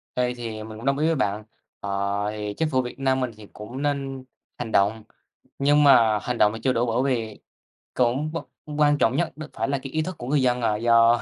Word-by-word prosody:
Đây, 125 0 +1
thì 115 -3 -6
mình 110 0 -9
cũng 115 - -9
đồng 140 0 +2
ý 155 +2 +1
với 165 - +2
bạn, 105 -6 -1 0.4
ờ, 100 0 -2
thì 105 -1 -4
chính 160 -1 0
phủ 130 -4 +2
Việt 125 +1 -7
Nam 135 -1 +1
mình 125 -2 -1
thì 105 -1 -12
cũng 120 +6 -8
nên 135 -2 -2 0.3
hành 120 -2 -5
động, 105 +2 +2 0.6
nhưng 145 +2 +4
mà 115 -6 +6
hành 125 -1 -3
động 105 -2 +4
thì - - -6
chưa 130 - +2
đủ 120 +1 +1
bởi 120 +2 0
vì 115 -6 -2 0.5
cũng 130 +5 +1
v 165 - -3 0.4
quan 145 -1 +4
trọng 125 -2 +2
nhất 170 +3 0
đ 155 - -7
phải 115 - -2
là 140 - +1
cái 135 - -7
ý 155 - 0
thức 180 +3 -4
của 120 - -7
người 140 +1 +2
dân, 125 -1 +1
ờ, 110 -2 +1
do 115 +1 +4
125 Hz, 240 wpm, -24 LUFS, 110-140 Hz, 0.6 s, mà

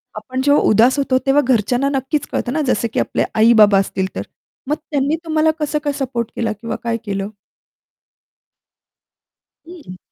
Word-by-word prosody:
आपण 260 0 -4
जेव्हा 285 0 +4
उदास 235 +6 +4
होतो, 270 -2 +1
तेव्हा 275 +2 +4
घरच्यांना 250 +3 +1
नक्कीच 270 +1 -2
कळतं 245 - -2
ना. 310 - 0
जसं 230 -1 +1
की - - 0
आपले - - 0
आई-बाबा 215 -3 +6
असतील 190 -1 -2
तर. - - -3 0.5
मग 300 - +1 0.2
त्यांनी 285 +2 +1
तुम्हाला 315 0 +2
कसं 300 0 -1
काय 290 -1 -1
सपोर्ट 240 -4 -3
केला 225 -2 -1
किंवा 230 - -4
काय 230 -1 -1
केलं? 200 0 -3 2.4
हं. 305 - -11
255 Hz, 155 wpm, -18 LUFS, 225-290 Hz, 2.4 s, आई-बाबा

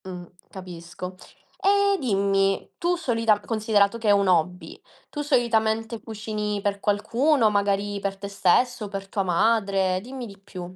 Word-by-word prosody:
Mh, 180 -2 -7 0.2
capisco. 180 0 -8 0.5
E 400 0 +4
dimmi, 195 -5 +1
tu 350 +1 +1
solitam 230 -10 +1
considerato 215 -1 +1
che 225 - -3
è - - +6
un 200 -1 +3
hobby, 180 0 0 0.3
tu 295 - -4
solitamente 225 -4 +1
cucini 215 -1 -4
per 200 0 -2
qualcuno, 225 +5 +2
magari 200 0 0
per 195 0 -3
te 200 +1 -6
stesso, 210 +4 +1
per 195 -1 -6
tua 195 - -2
madre? 195 0 +1
Dimmi 255 +3 -7
di 200 -3 -12
più. 185 -2 -9
205 Hz, 145 wpm, -24 LUFS, 195-230 Hz, 0.5 s, è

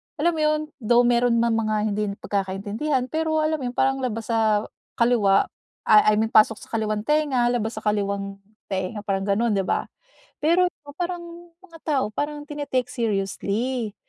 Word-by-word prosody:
alam 330 +2 +2
mo 320 - -4
yun, 305 0 +2 0.2
though 240 +1 +4
meron 240 0 +3
man 235 0 +2
mga 220 -1 0 0.2
hindi 210 +1 -1
pagkakaintindihan 205 +8 -2
pero 315 0 0
alam 310 0 0
yun 250 -2 -4
parang 270 0 +2
labas 230 -3 -3
sa 220 -2 +2 0.3
kaliwa, 230 -5 +3 0.4
ah, 215 -1 +6
I 215 - +5
mean 220 +1 0
pasok 215 +1 +5
sa - - -14
kaliwang 215 -2 -1
tenga, 280 -4 +2
labas 225 -2 -2
sa 215 - -7
kaliwang 200 -1 -1 0.3
tenga, 190 +2 -3
parang 195 -1 -2
gano'n, 220 +4 +2
'di 195 -2 0
ba? - - +1 0.6
Pero, 350 +4 +4 0.2
ah, 285 0 -12
parang 350 0 -2 0.4
mga 335 -3 -15
tao 280 -4 +2
parang 295 +5 -3
tini-take 285 -4 -3
seriously 220 +1 -2
235 Hz, 165 wpm, -24 LUFS, 210-285 Hz, 0.6 s, ah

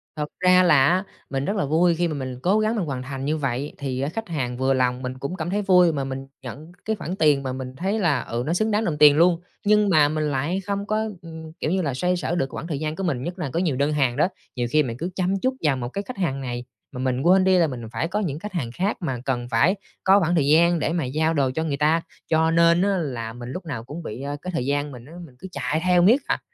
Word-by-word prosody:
Thật 150 -1 -2
ra 185 0 +5
là 150 -7 +5
á 180 +3 +2 0.3
mình 135 0 -2
rất 200 - -1
là 200 - 0
vui 165 +4 +3
khi 175 +1 +1
mà 160 - -3
mình 130 -3 -5
cố 200 +4 +3
gắng 215 +1 +1
mình 205 -6 -1
hoàn 130 -4 -4
thành 135 0 -5
như 155 +2 0
vậy, 135 0 -2
thì 130 -2 -3
á 140 - -1
khách 225 +7 -5
hàng 125 -7 -3
vừa 130 +1 +2
lòng, 125 -1 +1
mình 130 0 -5
cũng 140 +7 -4
cảm 175 -2 -4
thấy 205 +3 0
vui, 180 -3 +5
mà 140 -2 -2
mình 135 0 -5 0.2
nhận 145 +7 -9
cái 220 - 0
khoản 180 -2 -5
tiền 150 -6 +3
mà 130 -1 -3
mình 130 0 -6
thấy 195 +7 -1
là, 160 -9 +2
ừ, 120 +1 -3
nó 160 - 0
xứng 215 +5 +1
đáng 210 +2 +1
đồng 155 -6 -1
tiền 145 -1 +7
luôn. 170 +1 +4 0.2
Nhưng 210 0 +4
mà 155 -5 +5
mình 155 0 -1
lại 145 +8 -1
không 200 0 -2
có, 215 +1 0
ừm, 160 -2 -10
kiểu 155 - -1
như 190 +1 +1
là, 145 -6 -1
xoay 180 +8 0
sở 175 0 -2
được 135 -6 -2
quãng 165 - -5
thời 150 -5 -3
gian 155 0 -3
của 195 - -4
mình, 140 -9 -1
nhất 175 +4 -5
là 155 -6 -2
có 170 - +1
nhiều 170 -7 0
đơn 140 +3 +1
hàng 130 -5 +1
đó. - - +4 0.3
Nhiều 120 -2 -1
khi 155 +1 +4
mình 120 -3 -5
cứ 170 +6 -3
chăm 190 +1 0
chút 260 +1 +1
vào 145 -4 +2
một 120 -1 -4
cái 200 +9 -4
khách 255 - -7
hàng 140 -8 -1
này 120 -2 -4 0.3
mà 125 - -7
mình 130 0 0
quên 185 +5 +5
đi 190 0 +4
là 170 -2 +4
mình 125 -4 -6
phải 165 - -2
có 195 +5 -2
những 155 -8 -2
khách 210 +4 -7
hàng 130 -10 -3
khác, 190 - -1
mà 135 -7 -2
cần 120 -3 -1
phải 115 - +3 0.3
có 195 +1 +6
khoảng 175 -2 +1
thời 145 -4 +2
gian 170 +3 +4
để 155 - -1
mà 170 -2 0
giao 155 +5 0
đồ 140 -4 +1
cho 160 - 0
người 145 -3 -2
ta. 155 +3 +2 0.3
Cho 160 0 +2
nên 170 +1 +4
á 200 0 +2
là 120 -9 -4
mình 120 0 -8
lúc 180 +6 -6
nào 140 -8 -5
cũng 150 +8 -8
bị, 120 -2 -6
a, 140 +1 -4
cái 185 - -5
thời 145 -7 -1
gian 145 +1 -1
mình 120 -3 -11
á, 150 - -13
mình 130 -6 -17
cứ 190 - -8
chạy 140 +1 -2
theo 180 -1 +4
miết 230 +11 +5
à. - - 0
155 Hz, 295 wpm, -23 LUFS, 135-180 Hz, 0.3 s, tiền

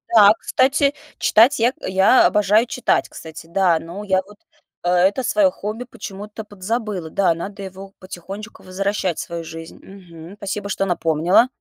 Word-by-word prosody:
Да, 210 -1 +8
кстати, 280 +2 +2 0.2
читать 230 +5 +4
я 240 +3 +3
я 190 +6 +4
обожаю 210 +2 +3
читать, 250 0 0
кстати, 160 0 -11
да. 175 -2 +2
Ну 175 +5 -8
я 190 -2 +1
вот, 210 0 -16 0.5
э 175 - 0
это 185 +8 +2
свое 300 0 +3
хобби 220 0 -6
почему-то 210 -2 -9
подзабыла. 205 -3 -4
Да, 185 +1 +2
надо 195 +4 -7
его 195 +1 -10
потихонечку 195 +4 -9
возвращать 190 -1 -2
в - - -2
свою 170 -1 -6
жизнь. 165 0 -10
Мгм. 180 -2 -13
Спасибо, 200 0 -5
что 195 - -1
напомнила. 175 +4 +2
195 Hz, 155 wpm, -20 LUFS, 180-215 Hz, 0.5 s, Да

